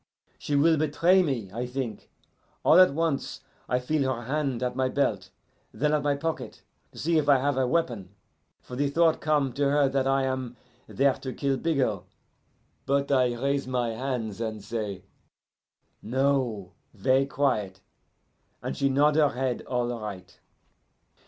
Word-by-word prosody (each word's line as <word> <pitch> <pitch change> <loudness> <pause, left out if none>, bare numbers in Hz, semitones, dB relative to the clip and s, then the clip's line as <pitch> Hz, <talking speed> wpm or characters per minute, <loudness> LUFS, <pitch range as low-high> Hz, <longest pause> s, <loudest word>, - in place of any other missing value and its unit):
She 145 - -2
will 160 +3 +4
betray 165 +5 +3
me, 125 - -2
I 120 +2 -3
think. 125 -3 -5 0.6
All - - +7
at 185 -5 +7
once 160 -1 -2 0.3
I 125 - +2
feel 135 +1 0
her 120 -2 -4
hand 135 -1 -2
at 125 0 -2
my 130 0 +1
belt, 105 -9 -1 0.4
then 150 +1 0
at 150 - +2
my 145 0 +1
pocket, 140 -6 -5 0.3
to - - -17
see 165 0 +2
if 145 -1 -1
I 140 - +7
have 140 +2 0
a 130 -1 +1
weapon; 120 - -1 0.5
for 125 - -9
the 140 +2 0
thought 165 +2 +2
come 145 -4 +1
to 140 +2 +1
her 145 0 +3
that 135 0 0
I 135 0 +2
am 130 -2 -3 0.3
there 135 0 +2
to 130 -1 -7
kill 140 -1 0
Bigot. 130 - 0 0.9
But 140 +1 +1
I 125 -3 +3
raise 140 0 -1
my 125 -2 -1
hands 115 -3 -4
and 110 -2 -4
say, 105 -4 -4 1.0
'No,' 125 -6 0 0.2
ver' 135 +1 +2
quiet, 110 -10 -1 0.8
and - - -3
she 140 - +1
nod 145 +3 +3
her 150 -2 +5
head 130 -1 -2
all 125 -1 -1
right. 100 -4 -8
135 Hz, 160 wpm, -27 LUFS, 120-145 Hz, 1.0 s, All